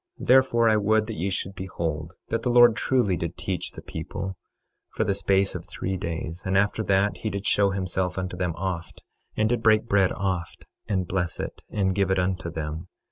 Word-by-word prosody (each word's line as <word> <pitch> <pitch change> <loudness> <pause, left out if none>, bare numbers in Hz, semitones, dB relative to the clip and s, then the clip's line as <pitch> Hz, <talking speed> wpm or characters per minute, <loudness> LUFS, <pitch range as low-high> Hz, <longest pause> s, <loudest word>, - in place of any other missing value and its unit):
26:13 - - -7
Therefore, 125 -3 +5
I 110 - +4
would 110 +1 +2
that 115 - -5
ye 95 +2 -1
should 95 0 -2
behold 85 -3 -4
that 115 - 0
the 125 - -1
Lord 120 -2 +7
truly 120 -7 +2
did 85 +1 -4
teach 90 0 -3
the - - -10
people, 95 0 -5 0.6
for - - +1
the 100 - +1
space 95 0 +2
of - - -7
three 95 +1 -3
days; 85 -1 -4
and 95 -1 +1
after 105 +3 +2
that 100 +1 +2
he 110 - -3
did 100 0 -4
show 100 -1 +3
himself 95 -1 -2
unto 90 -1 -3
them 90 -2 -2
oft, 85 -1 -4 0.3
and 110 - +3
did 120 0 0
break 110 0 +4
bread 100 -3 +3
oft, 95 -3 -3 0.2
and 95 -3 0
bless 90 -3 -2
it, - - -5
and 95 -2 0
give 100 -1 +1
it 95 - +2
unto 90 -1 -1
them. 80 +1 -5
95 Hz, 205 wpm, -26 LUFS, 90-105 Hz, 0.6 s, Lord